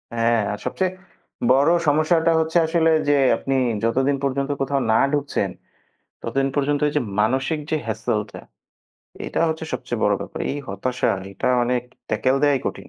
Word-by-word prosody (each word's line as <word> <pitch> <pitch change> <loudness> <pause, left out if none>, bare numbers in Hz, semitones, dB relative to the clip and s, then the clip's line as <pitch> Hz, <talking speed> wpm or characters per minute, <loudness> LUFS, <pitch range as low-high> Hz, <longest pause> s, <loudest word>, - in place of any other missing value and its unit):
হ্যাঁ, 115 -1 +2
আর - - -6
সবচেয়ে 185 -1 -1 0.6
বড় 140 +4 +4 0.2
সমস্যাটা 160 +3 +3
হচ্ছে 160 +2 +1
আসলে 165 -1 +2 0.2
যে, 145 - +5 0.2
আপনি 135 0 -2 0.3
যতদিন 135 +4 +2
পর্যন্ত 140 +1 -1
কোথাও 135 0 0
না - - +4
ঢুকছেন, 145 -1 -1 0.7
ততদিন 135 0 -1
পর্যন্ত 145 +1 0
যে 150 - +3 0.2
মানসিক 135 +8 +1
যে - - +2
হেসেলটা, 105 -2 -3 0.9
এটা - - -2
হচ্ছে 160 0 -3
সবচেয়ে 120 -3 -3
বড় 105 0 +3
ব্যাপার। - - -7
এই 145 - -3
হতাশা 125 -1 -1 0.2
এটা 100 - -2
অনেক, 125 0 0 0.3
ট্যাকল 130 +1 +1
দেওয়াই 145 -3 +3
কঠিন। - - -5
135 Hz, 150 wpm, -22 LUFS, 120-150 Hz, 0.9 s, যে